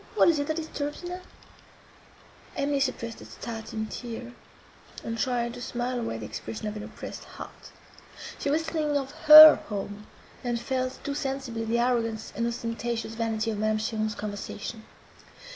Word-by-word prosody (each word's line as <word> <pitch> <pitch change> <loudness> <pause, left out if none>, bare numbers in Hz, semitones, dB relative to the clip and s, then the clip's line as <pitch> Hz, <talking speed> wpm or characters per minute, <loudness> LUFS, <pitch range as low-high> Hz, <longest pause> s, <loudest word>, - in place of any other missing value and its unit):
—What 425 - +6
is 320 -3 +3
it 285 - -1
that 315 - 0
disturbs 300 -1 -4
you 350 - -5
now?" 360 +1 -5 1.3
Emily 280 0 0
suppressed 235 -4 -2
a - - -10
starting 220 -1 -5
tear, 240 +2 -7 0.7
and 230 - -3
tried 240 -1 0
to 245 - -8
smile 245 +1 -2
away 170 - -3
the 110 - -6
expression 110 - -6
of 210 - -4
an 210 - -5
oppressed - - -8
heart; - - -11 0.7
she 285 - -1
was 310 +3 +2
thinking 310 -3 0
of 270 -1 -3 0.2
her 310 +1 +13
home, 205 0 -5 0.4
and 240 -1 -1
felt 255 +2 -2
too 285 - -2
sensibly 270 -5 -3
the 230 +1 +1
arrogance 230 -2 0
and 230 +1 0
ostentatious 230 -1 -3
vanity 225 -1 -1
of 210 - -4
Madame 215 0 +2
Cheron's 215 -1 -1
conversation. 210 +2 -6
235 Hz, 160 wpm, -27 LUFS, 220-275 Hz, 1.3 s, her